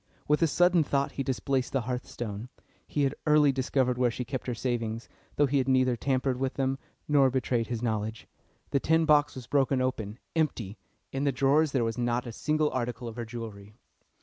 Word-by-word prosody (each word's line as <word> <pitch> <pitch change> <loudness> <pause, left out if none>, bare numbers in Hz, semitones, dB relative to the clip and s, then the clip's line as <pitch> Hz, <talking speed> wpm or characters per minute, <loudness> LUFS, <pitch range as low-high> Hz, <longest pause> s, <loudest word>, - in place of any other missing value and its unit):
With 150 +2 +3
a 165 - +5
sudden 175 +1 +4
thought 140 -1 0
he - - -4
displaced 130 0 -1
the 135 - +2
hearthstone. 120 -2 -5 0.4
He 145 - 0
had 135 0 +1
early 150 -2 +5
discovered 130 -1 0
where 125 -1 +4
she 125 +2 -4
kept 130 0 -5
her 125 - -1
savings, 115 -1 -2 0.3
though 145 - +4
he 140 0 +1
had 130 - 0
neither 130 -1 +3
tampered 130 +1 0
with 135 0 -1
them 135 0 0 0.3
nor 140 -3 +5
betrayed 125 -2 0
his 120 -1 -3
knowledge. 110 -1 -2 0.5
The 140 - +3
tin 160 +3 +3
box 150 -2 +4
was 130 -2 -7
broken 135 0 +2
open, 115 -4 -2 0.2
empty! 120 -10 -1 0.3
In 135 +1 -2
the 140 - +3
drawers 140 +4 +3
there 130 -3 +1
was 115 +1 -2
not 120 +1 0
a 120 - -5
single 155 +5 0
article 120 -1 -3
of 115 - -7
her 120 -1 -4
jewellery. 110 -3 -8
130 Hz, 200 wpm, -28 LUFS, 120-140 Hz, 0.5 s, a